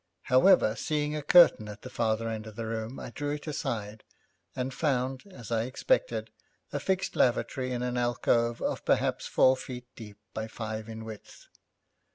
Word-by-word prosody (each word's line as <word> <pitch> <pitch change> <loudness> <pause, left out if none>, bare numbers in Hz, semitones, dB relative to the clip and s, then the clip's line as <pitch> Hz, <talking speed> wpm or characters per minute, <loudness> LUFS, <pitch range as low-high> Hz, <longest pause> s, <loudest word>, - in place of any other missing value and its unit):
However, 130 - +5
seeing 150 +5 -1
a 150 - -2
curtain 150 -8 +6
at 105 0 -10
the - - -7
farther 115 0 0
end 110 -1 -4
of 110 - -10
the 115 0 -4
room, 110 +3 -4
I - - -7
drew 145 +3 -2
it 150 - -9
aside, 110 -8 -4 0.5
and 130 +1 -2
found, 130 -3 0
as 120 - -11
I 115 0 +1
expected, - - 0 0.4
a - - -1
fixed 190 0 -1
lavatory 130 +1 +1
in 125 0 -2
an 125 0 -2
alcove 120 -1 +1
of - - -2
perhaps - - +1
four 130 0 +5
feet 125 -1 -8
deep 105 -3 -10 0.2
by 110 0 -3
five 110 0 -5
in 110 0 -7
width. 110 -2 -11
120 Hz, 175 wpm, -29 LUFS, 110-135 Hz, 0.5 s, curtain